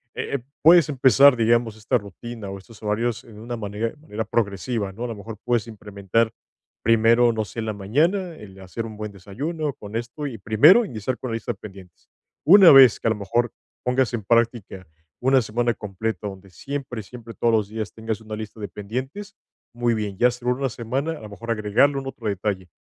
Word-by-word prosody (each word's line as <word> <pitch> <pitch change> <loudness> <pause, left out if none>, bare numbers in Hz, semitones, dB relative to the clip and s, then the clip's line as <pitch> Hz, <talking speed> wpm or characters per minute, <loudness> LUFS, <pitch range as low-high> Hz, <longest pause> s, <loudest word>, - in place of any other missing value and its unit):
eh, 140 - -3 0.2
puedes 165 0 +7
empezar, 135 0 +6
digamos, 115 -1 +2
esta 110 +4 +1
rutina 105 +2 -9
o 100 - -6
estos 105 +3 -16
horarios 115 +2 -1
de 115 - -16
una 120 +2 -5
manera 105 +2 -3
manera 110 -7 -5
progresiva, 105 -1 -1
¿no? 110 +5 -7
A - - -2
lo 115 - -5
mejor, 105 +1 -9
puedes 120 -2 +1
implementar 105 0 -1 0.5
primero, 115 +2 +4
no 110 -1 -2
sé, 115 - -8
en 110 - -2
la 110 - -1
mañana, 160 - 0
el 95 -5 -13
hacer 95 +5 -6
un 110 -1 -10
buen 105 -1 -5
desayuno 140 - -4
con 105 -1 -10
esto, 120 +6 -4
y 120 -5 -6
primero 145 - +6
iniciar 120 - -4
con 130 - -5
la 115 - -1
lista 115 +1 -3
de 100 - -21
pendientes. 95 -4 -13 0.4
Una 190 0 +9
vez 135 -4 +8
que, - - -2
a - - +3
lo - - 0
mejor, 115 +4 -1 0.3
pongas 125 0 +1
en 110 -4 -3
práctica 115 -4 0 0.3
una 130 +1 +4
semana 120 +2 0
completa, 105 +1 -4
donde 95 -1 -10
siempre 135 +1 -5
siempre, 115 +2 -11
todos 120 - +1
los 105 -3 +1
días 110 -1 -5
tengas 110 0 -4
una 110 0 -7
lista 110 0 -8
de 105 - -4
pendientes, 130 - -6 0.4
muy 120 0 +1
bien. 105 -2 -3
Ya, 125 - +5
segunda 125 +2 -1
semana, 130 +7 -3
a 155 - -10
lo 105 - -9
mejor, 115 +3 -10
agregarle 115 +6 +2
algún 135 0 -4
otro 120 -4 -6
detalle, 100 -2 -2
115 Hz, 200 wpm, -23 LUFS, 105-125 Hz, 0.5 s, Una